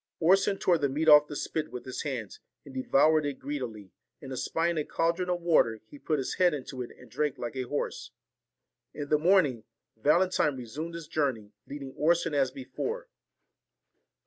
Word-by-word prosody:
Orson 195 +4 +4
tore 175 -3 +2
the 140 -1 +1
meat 155 +4 -1
off 150 -1 +8
the 145 - -7
spit 155 +2 -3
with 125 - -7
his 130 - -4
hands, 125 -8 -5 0.3
and 140 - -11
devoured 145 +4 +3
it 145 -2 -3
greedily; 125 -9 -6 0.3
and 135 -1 -8
espying 165 +5 0
a - - 0
caldron 170 +4 0
of 175 -1 -1
water, 155 -10 +3
he 140 +6 -14
put 155 +1 0
his 135 - -2
head 180 -4 +4
into 130 -2 -6
it 120 - -5
and 125 - -15
drank 150 -2 -1
like 120 +2 -5
a 130 -1 -3
horse. 145 - -3 0.9
In 145 -1 -5
the 150 - +3
morning, 155 - +3 0.3
Valentine 150 +3 +2
resumed 150 +8 -6
his 165 -2 -7
journey, 130 -10 -1 0.2
leading 140 -2 -7
Orson 165 0 +2
as 135 -2 +2
before. 455 - -5
145 Hz, 175 wpm, -29 LUFS, 130-165 Hz, 0.9 s, off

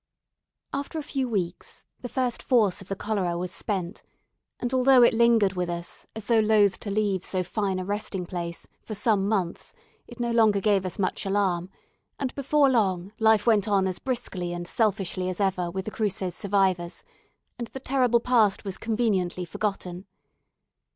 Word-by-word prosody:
After 280 +3 -4
a 310 - -3
few 270 -3 -2
weeks, 185 -5 -3 0.2
the 245 - -5
first 250 -2 -1
force 210 -7 +2
of 190 - -12
the 195 - -3
cholera 190 -4 -1
was 180 +1 -3
spent, 190 -2 -2 0.6
and 245 +1 -3
although 260 -1 +6
it 235 - +5
lingered 225 -4 +4
with 180 -1 -2
us, 170 0 -6
as 220 -2 -7
though 230 +1 +3
loath 210 -3 +3
to 205 - -5
leave 200 -3 0
so 185 -1 -1
fine 195 +1 -2
a 185 - -3
resting 200 -2 -3
place, 170 -1 -5
for 215 - -6
some 205 -1 +1
months, 185 -6 -2 0.3
it - - -12
no 240 -1 0
longer 220 -3 +4
gave 195 -2 +2
us 180 - -5
much 190 -2 -1
alarm; 190 -3 0 0.5
and 270 -3 -3
before 285 +1 +3
long, 195 -7 +1
life 220 -2 +4
went 220 -3 +3
on 195 -2 +2
as 185 - -3
briskly 200 -9 -3
and 175 0 -5
selfishly 195 -4 0
as 185 - -5
ever 185 -3 0
with 190 +2 -4
the 215 - -4
Cruces 195 -4 -2
survivors, 190 -3 0 0.6
and 235 - -3
the 265 - -8
terrible 255 -3 +2
past 230 -5 +2
was 195 -2 -4
conveniently 205 -6 0
forgotten. 185 0 -4
200 Hz, 175 wpm, -26 LUFS, 185-230 Hz, 0.6 s, although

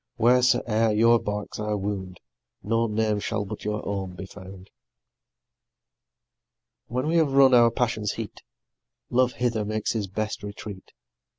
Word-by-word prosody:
wheres'e'er 120 -2 +3
your 115 +1 +5
barks 105 0 -5
I 105 0 -1
wound, 95 -2 -4 0.4
No 115 +2 +1
name 105 -1 0
shall 105 0 -2
but 105 +1 -7
your 105 0 -3
own 95 -2 -3
be 95 - -7
found. 95 -1 -12 2.2
When 125 +3 -2
we 165 +2 +2
have 155 -4 +2
run 135 -1 +6
our 120 -1 +7
passion's 110 -4 -1
heat, 115 -2 -7 0.7
Love 125 0 +3
hither 115 -3 -1
makes 110 0 -2
his 105 -4 -2
best 105 +3 -3
retreat. 100 -1 -9
110 Hz, 135 wpm, -25 LUFS, 100-120 Hz, 2.2 s, our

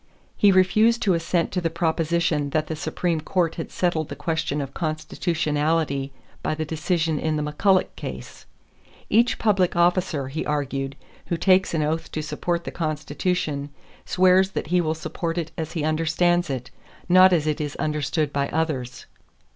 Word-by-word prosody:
He 205 - +5
refused 215 +5 +4
to 195 - +3
assent 170 0 0
to 180 - -1
the 165 - 0
proposition 165 -2 0
that 155 +2 0
the 160 - -4
Supreme 160 +1 -2
Court 170 +1 0
had 165 - -6
settled 165 -4 0
the 145 - -5
question 150 0 -2
of 135 -1 -5
constitutionality 155 -3 -1 0.3
by - - -1
the 155 0 -3
decision 160 0 -1
in 155 -1 0
the 150 - -1
McCulloch 185 +6 +1
case. - - -8 0.6
"Each 235 +3 +4
public 195 -5 +2
officer," 175 -5 +1
he 155 +4 -3
argued, 140 -2 -2 0.3
"who 170 - -1
takes 185 0 +3
an 155 - +1
oath 160 +2 -2
to 155 - -2
support 170 +3 -2
the - - -5
Constitution, 155 -1 -2 0.3
swears 185 +1 +4
that - - -2
he 180 - +4
will 160 -1 -1
support 165 +1 -4
it 165 -2 -3
as 160 -1 -5
he 160 - -2
understands 165 +2 +1
it, 125 -3 -4 0.4
not 185 +1 +7
as 165 -4 +2
it 155 0 -1
is 145 -1 -4
understood 150 0 -1
by 140 0 0
others." 145 -6 -2
160 Hz, 165 wpm, -24 LUFS, 150-175 Hz, 0.6 s, not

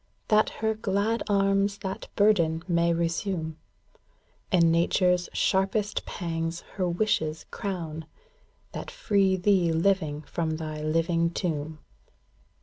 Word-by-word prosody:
That 215 -1 +4 0.2
her 220 - +3
glad 215 +1 0
arms 195 0 +2
that 190 -1 -5
burden 170 -6 +3
may 170 -1 +2
resume; 170 -1 -2 0.9
And 170 -3 +5
nature's 180 +1 +2
sharpest 200 +2 0
pangs 165 -1 -3
her 185 -3 -1
wishes 160 -5 0
crown, 165 -5 -5 0.6
That - - -6
free 200 - +2
thee 185 -2 +2
living 160 -3 +1
from 160 +1 -2
thy 155 -1 -5
living 165 +2 +1
tomb. 160 -3 -3
175 Hz, 110 wpm, -27 LUFS, 165-195 Hz, 0.9 s, And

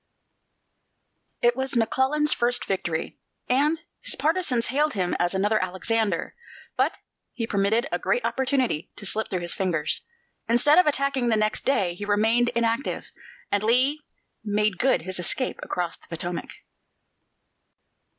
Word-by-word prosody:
It 240 0 +4
was 265 -1 -2
McClellan's 265 +6 +2
first 245 +1 0
victory, 175 -4 -2 0.3
and 290 +6 +2 0.2
his - - -1
partisans 310 -7 +1
hailed 300 0 +2
him 180 -3 0
as 175 +2 +1
another 205 +2 +2
Alexander; 190 +1 -1 0.4
but - - +1 0.4
he 230 - -2
permitted 220 +4 +1
a - - 0
great - - 0
opportunity 260 - 0
to 205 - -8
slip 220 +3 0
through 185 -2 -2
his 175 0 -2
fingers. 165 -5 0 0.5
Instead 290 +8 +5
of 365 - +4
attacking 275 -3 +1
next 215 -1 +1
day, 190 -10 +2
he 180 - -8
remained 220 +4 +3
inactive, 230 +3 -1 0.4
and 205 - +2
Lee 260 +7 +3 0.4
made 210 -2 0
good 265 -9 +2
his 185 +1 -5
escape 255 +8 -2
across 175 -2 -3
the - - -21
Potomac. 170 +1 -5
225 Hz, 135 wpm, -25 LUFS, 190-265 Hz, 0.5 s, Instead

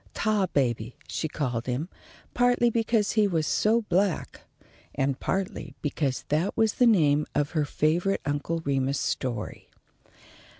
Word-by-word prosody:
"Tarbaby" 140 - 0
she 160 - -2
called 125 -6 -3
him, 130 +6 -2 0.5
partly 245 -1 +3
because 225 -2 +1
he 215 -2 +3
was 165 -5 0
so 225 +7 +2
black, 195 -2 0 0.5
and 135 -1 0
partly 190 -1 -3
because 145 -3 -1
that 155 +6 0
was 220 -2 +3
the 250 - +4
name 150 -9 +3
of 145 0 0
her 155 -3 0
favourite 170 +7 0
Uncle 145 +3 -2
Remus 135 0 0
story. 120 -5 -3
155 Hz, 130 wpm, -27 LUFS, 140-205 Hz, 0.5 s, the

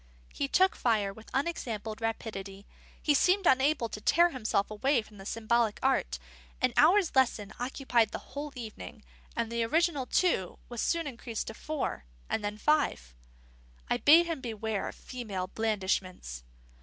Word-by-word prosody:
He 280 - -1
took 375 +7 +3
fire 210 -5 +1
with 220 +2 -14
unexampled 230 -7 -3
rapidity; 200 -3 -4 0.3
he 295 - +2
seemed 370 +6 +3
unable 265 -3 +3
to 210 - -7
tear 345 +7 +4
himself 215 -6 -1
away 240 +3 +1
from 210 -2 -16
the 195 - -8
symbolic 230 -1 +1
art; - - +1 0.4
an - - +2
hour's 375 -3 +5
lesson 225 -6 +2
occupied 245 -3 +1
the - - -4 0.2
whole 290 +1 -4
evening; 225 -2 -8 0.3
and 230 -1 -1
the 235 0 0
original 300 +1 +1
two 265 - +1
was 240 -2 -4
soon 335 -1 0
increased 235 -4 -5
to 225 - -6
four, 295 - -4 0.3
and 215 - 0
then 205 0 -3
to - - -18
five. 65 - +1 0.8
I - - +3
bade 330 +4 +7
him 330 -5 -3
beware 220 -4 -3
of - - -7
female 215 -8 -5
blandishments. 190 - -2
230 Hz, 155 wpm, -30 LUFS, 210-285 Hz, 0.8 s, bade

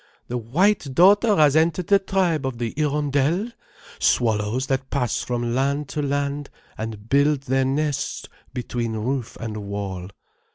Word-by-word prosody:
The 125 - -2
white 145 - +1
daughter 205 +4 +6
has 150 -4 +4
entered 165 +2 +2
the 200 +3 +4
tribe 185 -6 0
of 130 -3 -4
the 115 -1 -3
Hirondelles, 150 - 0 0.5
swallows 110 +2 +1
that 135 -1 -2
pass 125 -6 0
from 120 -1 -2
land 140 +2 0
to 150 - -2
land, 145 0 -2 0.3
and 110 -1 -6
build 140 +2 +3
their 135 -1 +1
nests 145 +1 -1 0.2
between 120 -2 -3
roof 115 +2 -3
and 110 -2 -5
wall. 100 -3 -5
135 Hz, 140 wpm, -23 LUFS, 120-150 Hz, 0.5 s, daughter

